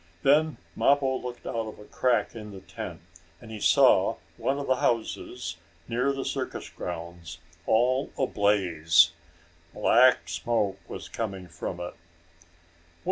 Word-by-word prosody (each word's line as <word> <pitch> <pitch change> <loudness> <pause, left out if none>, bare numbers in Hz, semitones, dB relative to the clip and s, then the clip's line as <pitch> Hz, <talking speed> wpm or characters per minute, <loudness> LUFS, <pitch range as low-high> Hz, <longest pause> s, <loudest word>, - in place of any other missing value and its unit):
Then 155 +3 +4 0.2
Mappo 135 -2 +3
looked 125 -1 -7
out - - -4
of 110 - -8
a 105 - -12
crack 125 +2 +1
in 105 -2 -8
the 95 - -9
tent, - - -8 0.4
and 110 - -12
he 110 - -6
saw - - +5 0.2
one 135 - -1
of 145 - -3
the 130 - +2
houses, 115 -6 -2 0.3
near 125 +4 +1
the 135 -1 -4
circus - - -4
grounds, 85 -1 -7 0.3
all 125 +4 +2
ablaze. 90 -8 +3 0.6
Black 120 -8 +5
smoke 95 +3 -1
was - - -7
coming 95 -5 -5
from 85 +1 -6
it. 90 0 -5
110 Hz, 135 wpm, -27 LUFS, 90-130 Hz, 0.6 s, saw